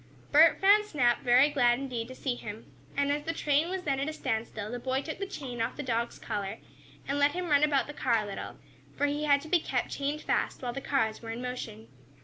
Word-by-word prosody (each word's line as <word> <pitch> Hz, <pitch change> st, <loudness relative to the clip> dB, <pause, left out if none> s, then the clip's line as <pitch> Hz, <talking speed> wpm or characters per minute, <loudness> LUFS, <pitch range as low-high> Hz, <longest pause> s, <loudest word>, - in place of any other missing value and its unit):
Bert 315 Hz, +3 st, +6 dB
found 405 Hz, +2 st, +6 dB
Snap 250 Hz, -11 st, +2 dB
very 250 Hz, +4 st, +5 dB
glad 245 Hz, -4 st, +3 dB
indeed 245 Hz, -4 st, -4 dB
to 255 Hz, -, -9 dB
see 260 Hz, -1 st, -2 dB
him, 220 Hz, -2 st, -9 dB, 0.2 s
and 280 Hz, 0 st, +2 dB
as 295 Hz, +1 st, 0 dB
the 325 Hz, +3 st, -3 dB
train 300 Hz, +1 st, +1 dB
was 375 Hz, 0 st, -3 dB
then 275 Hz, -4 st, 0 dB
at 280 Hz, +3 st, -1 dB
a -, -, -5 dB
standstill 220 Hz, -6 st, -3 dB
the 245 Hz, -, -4 dB
boy 260 Hz, +2 st, -1 dB
took 315 Hz, -, -6 dB
the 395 Hz, -, -3 dB
chain 255 Hz, -10 st, -6 dB
off 230 Hz, -, -1 dB
the 295 Hz, -, -4 dB
dog's 235 Hz, -2 st, -1 dB
collar, 200 Hz, +1 st, -4 dB, 0.5 s
and 280 Hz, +1 st, -1 dB
let 285 Hz, 0 st, +4 dB
him 360 Hz, -1 st, -3 dB
run 285 Hz, -1 st, +5 dB
about 290 Hz, -3 st, +3 dB
the 295 Hz, -, -8 dB
car 235 Hz, -6 st, +1 dB
a -, -, -6 dB
little, 200 Hz, -1 st, -6 dB, 0.4 s
for 290 Hz, -, +2 dB
he 290 Hz, +1 st, -1 dB
had 285 Hz, -1 st, +4 dB
to 310 Hz, -, -10 dB
be 355 Hz, +2 st, +3 dB
kept -, -, -2 dB
chained 285 Hz, +2 st, -2 dB
fast -, -, -1 dB
while 245 Hz, -1 st, -2 dB
the 275 Hz, -, -5 dB
cars 225 Hz, -6 st, 0 dB
were 225 Hz, -, -8 dB
in 225 Hz, +1 st, -4 dB
motion. 245 Hz, -, -6 dB
275 Hz, 245 wpm, -29 LUFS, 240-295 Hz, 0.5 s, Bert